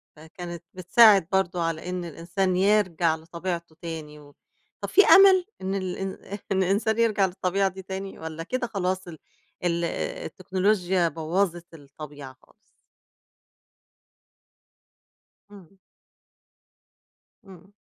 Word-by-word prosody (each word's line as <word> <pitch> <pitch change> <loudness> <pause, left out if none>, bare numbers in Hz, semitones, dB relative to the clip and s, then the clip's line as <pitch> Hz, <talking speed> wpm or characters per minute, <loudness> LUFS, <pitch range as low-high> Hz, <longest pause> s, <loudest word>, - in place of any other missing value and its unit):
فكانت 170 +2 -9
بتساعد 195 0 +5
برضه 185 -2 0
على 165 +2 -3
إن 180 -1 -4
الإنسان 175 +4 -2
يرجع 185 -4 +2
لطبيعته 170 0 -6
تاني 155 -3 -7
و 145 -1 -17 0.5
طب - - -4
في 405 - +6
أمل؟ 380 -2 +7 0.2
إن 190 +1 -2
ال 185 -2 -3
إن 195 0 -4 0.4
إن 190 0 +2
الإنسان 215 +4 0
يرجع 215 -4 +3
للطبيعة 190 +1 0
دي 190 +1 -10
تاني 190 +1 -7
والّا 160 0 -6
كده 250 +5 -3
خلاص 185 -3 -2
ال 160 -3 -10 0.4
ال 170 -1 0
التكنولوجيا 190 - -1
بوّظِت 170 +1 -2
الطبيعة 145 -2 -11
خالص؟ - - -25 3.0
إمم. 195 -1 -16 1.7
إمم. 190 +1 -15
180 Hz, 110 wpm, -25 LUFS, 165-195 Hz, 3.0 s, أمل